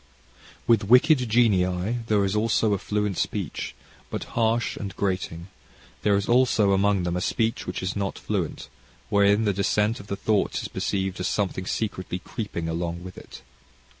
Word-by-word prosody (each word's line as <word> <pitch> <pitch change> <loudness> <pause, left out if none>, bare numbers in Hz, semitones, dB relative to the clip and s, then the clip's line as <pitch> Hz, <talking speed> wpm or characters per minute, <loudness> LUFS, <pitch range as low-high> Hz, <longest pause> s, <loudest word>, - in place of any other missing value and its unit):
"With 115 -4 +3
wicked 125 +2 +5
genii 105 -1 +2
there 105 -2 +3
is 95 +1 -1
also 110 0 +2
a 100 - 0
fluent 105 -2 -1
speech, - - -3 0.3
but - - -4
harsh 115 +1 +1
and 100 -1 -6
grating. 90 -2 -2 0.5
There 105 -1 +3
is 100 0 0
also 120 -5 +4
among 100 -1 +2
them 85 0 -1
a 90 - -1
speech 115 +4 -1
which 90 +1 -4
is 95 - -2
not 100 -1 -2
fluent, - - -3 0.4
wherein 100 +2 +4
the 100 - +2
dissent 105 +4 +1
of 100 - -11
the 100 - -2
thoughts 105 0 0
is - - -5
perceived 95 -1 -2
as 90 - -1
something 95 -2 -1
secretly 95 -4 -2
creeping 90 -3 -5
along 85 +1 -3
within 95 -1 -10
it." - - -12
100 Hz, 165 wpm, -25 LUFS, 95-110 Hz, 0.5 s, wicked